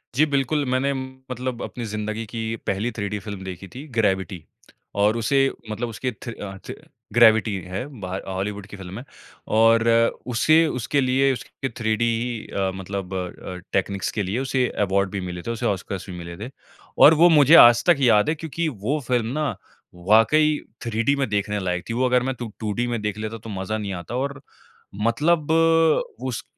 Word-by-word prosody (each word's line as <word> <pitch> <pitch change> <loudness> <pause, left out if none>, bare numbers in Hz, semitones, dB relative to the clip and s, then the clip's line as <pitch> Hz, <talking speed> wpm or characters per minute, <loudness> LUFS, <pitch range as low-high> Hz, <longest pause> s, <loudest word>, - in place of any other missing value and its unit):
जी 150 +4 +5
बिल्कुल, 145 0 0
मैंने 130 +2 +1 0.4
मतलब 125 -1 -4
अपनी 120 - -6
ज़िंदगी 110 +1 -4
की 115 +1 -4
पहली 105 +5 -1
3D 105 -2 -4
फ़िल्म 100 -3 -7
देखी 95 0 -7
थी 135 +4 -7
ग्रेविटी। 95 -4 0 0.6
और 105 +3 +3
उसे 135 +4 +2 0.3
मतलब 115 +3 -3
उसके 125 +3 -3
थि 120 +1 -8
अ, 95 -3 -8
थि - - -8 0.4
ग्रेविटी 110 -3 +5 0.2
है 100 +7 -3
बाह 95 -1 -4
हॉलीवुड 100 +1 -4
की 105 - -10
फ़िल्म 95 +2 -8
है 125 - -10 0.5
और 115 +1 +5 0.5
उसे 155 +8 +4
उसके 140 +4 0
लिए 135 +1 +3
उसके 135 +2 -6
3D 110 -2 -2
ही 115 0 -1
अ, 95 -1 0
मतलब 95 0 -5
अ 90 -1 -5
अ, - - -7 0.2
टेक्नीक्स 95 0 -1
के 105 - -2
लिए 100 +6 -2
उसे 130 -1 0 0.2
अवार्ड 100 +1 +1
भी 100 - -3
मिले 90 0 -6
थे 115 - -4
उसे 115 - -4
ऑस्कर्स 95 -1 -3
भी 90 - -6
मिले 85 0 -8
थे। 110 +5 -6 0.5
और 150 - +9
वो 175 - +8
मुझे 150 -1 +7
आज 120 0 +3
तक 170 - +6
याद 120 -1 +4
है 160 - +1
क्योंकि 160 +1 -3
वो 125 +4 -2
फ़िल्म 120 -3 +1
ना 155 -2 0 0.5
वाक़ई 115 - +3 0.3
3D 115 +5 +1
में 135 - +1
देखने 105 0 -1
लायक 90 -1 -2
थी। - - -1
वो 125 +2 +1
अगर 125 0 +3
मैं 130 +1 -1
2 120 - -4
2D 110 +3 -1
में 120 -2 -2
देख 105 0 -3
लेता 110 +1 -5
तो 115 +1 -11
मज़ा 110 +3 -2
नहीं 100 -2 -4
आता 110 +8 -7
और 140 +2 -3 0.7
मतलब 155 +5 +1
उस 160 -6 +2
115 Hz, 185 wpm, -23 LUFS, 100-130 Hz, 0.7 s, और